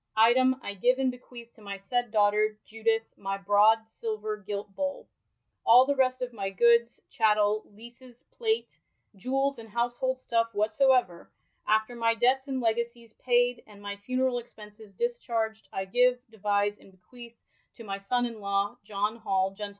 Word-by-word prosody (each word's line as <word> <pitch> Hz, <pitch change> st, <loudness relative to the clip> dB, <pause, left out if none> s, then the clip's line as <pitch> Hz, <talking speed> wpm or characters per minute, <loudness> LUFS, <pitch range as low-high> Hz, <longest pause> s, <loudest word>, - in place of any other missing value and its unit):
Item, 255 Hz, +4 st, +5 dB
I 200 Hz, -, -4 dB
gyve 245 Hz, +6 st, +2 dB
and 260 Hz, -1 st, +2 dB
bequeath 245 Hz, -1 st, -13 dB
to 220 Hz, -, -20 dB
my 200 Hz, -1 st, -6 dB
saied 245 Hz, +5 st, -2 dB
daughter 210 Hz, 0 st, +2 dB
Judith 225 Hz, 0 st, 0 dB
my 195 Hz, 0 st, -3 dB
broad 210 Hz, +3 st, +4 dB
silver 215 Hz, -1 st, -4 dB
gilt 205 Hz, -1 st, -7 dB
bole. 280 Hz, 0 st, -3 dB, 0.6 s
All 245 Hz, +3 st, +7 dB
the 285 Hz, +1 st, 0 dB
rest 255 Hz, -1 st, +1 dB
of 245 Hz, -1 st, -5 dB
my 195 Hz, -3 st, -3 dB
goodes, 235 Hz, +4 st, +3 dB
chattel, 215 Hz, -1 st, +2 dB
leases, 240 Hz, +3 st, -15 dB
plate, 450 Hz, -2 st, -2 dB, 0.4 s
jewels, 270 Hz, +6 st, -1 dB
and 225 Hz, -1 st, -11 dB
household 240 Hz, +3 st, -1 dB
stuffe 230 Hz, -3 st, -1 dB
whatsoever, 215 Hz, -3 st, +2 dB, 0.4 s
after 220 Hz, +3 st, +1 dB
my 230 Hz, -1 st, +1 dB
dettes 255 Hz, +4 st, +2 dB
and 265 Hz, -1 st, -2 dB
legasies 235 Hz, 0 st, -2 dB
paied, 245 Hz, 0 st, +2 dB
and 210 Hz, -2 st, -15 dB
my 205 Hz, 0 st, -6 dB
funerall 255 Hz, +3 st, -1 dB
expenses 210 Hz, -2 st, -15 dB
dischardged, 230 Hz, -, -2 dB
I 190 Hz, -, -3 dB
give, 250 Hz, +5 st, +3 dB
devise, 205 Hz, -1 st, 0 dB
and -, -, -18 dB
bequeath 235 Hz, +5 st, -14 dB, 0.4 s
to 230 Hz, -, -11 dB
my 195 Hz, -2 st, -5 dB
sonne 245 Hz, +5 st, 0 dB
in 230 Hz, -3 st, -7 dB
lawe, 200 Hz, +3 st, -1 dB
John 210 Hz, +2 st, -2 dB
Hall 195 Hz, -4 st, 0 dB
gent. 205 Hz, +1 st, -6 dB
225 Hz, 160 wpm, -28 LUFS, 205-245 Hz, 0.6 s, All